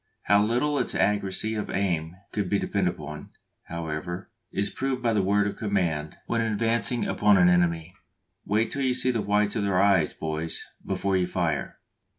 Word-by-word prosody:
How 100 +1 +4
little 125 +7 +1
its - - -1
accuracy 105 +1 +1
of 105 -1 -3
aim 85 -4 -1 0.2
could 100 -3 -2
be 100 - +2
depended 95 -3 0
upon, 75 +1 -8 0.4
however, 85 +4 -5 0.2
is 100 +1 -1
proved 130 -1 -2
by 115 -1 +2
the 105 - +3
word 100 +2 +2
of 105 - -3
command 85 -8 -1
when 115 0 0
advancing 115 +1 +1
upon 105 -1 +4
an 90 -1 +6
enemy, 85 -1 +1 0.5
"Wait 110 +3 +1
till 140 - -2
you 130 -2 +1
see 130 - +3
the 115 -3 -1
whites 105 +1 +1
of 110 - 0
their 100 -2 +1
eyes, 95 -5 +4
boys, 80 +1 -4 0.2
before 95 0 -1
you 90 -1 +1
fire!" 90 -3 -2
100 Hz, 175 wpm, -26 LUFS, 90-110 Hz, 0.5 s, an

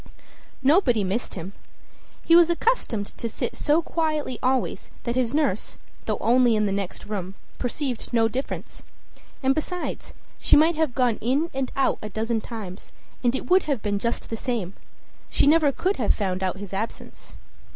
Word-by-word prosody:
Nobody 265 - +4
missed 195 +6 -2
him. 185 +2 -6 0.7
He 330 - +5
was 345 -1 +7
accustomed 340 - +1
to 230 - -4
sit - - -3
so 310 +3 +2
quietly 310 -7 -1
always 260 0 0
that 235 - -1
his 245 -2 +1
nurse, 280 -9 0 0.3
though - - 0
only 240 0 +4
in 215 0 +2
the 200 - 0
next 195 -2 -4
room, 195 -2 -4 0.2
perceived 250 0 -3
no 230 -2 +4
difference. 255 +5 -5 0.6
And 265 +1 +4
besides, 355 +4 -4 0.2
she - - +5
might 320 +3 +5
have 310 -5 0
gone 245 -4 +2
in 280 +8 +1
and 265 -1 -2
out 275 - +2
a 215 - -5
dozen 220 +2 -1
times, 205 -6 -8 0.3
and 245 +1 +3
it - - -4
would 370 +1 +5
have 270 -7 0
been 205 -1 0
just 235 +2 -2
the 225 - -2
same; 220 -7 -2 0.6
she - - +3
never 300 0 +5
could 375 +8 -1
have 230 - +2
found 190 -3 -2
out 185 0 -1
his 200 -1 -8
absence. 215 +4 -6
245 Hz, 170 wpm, -25 LUFS, 210-290 Hz, 0.7 s, was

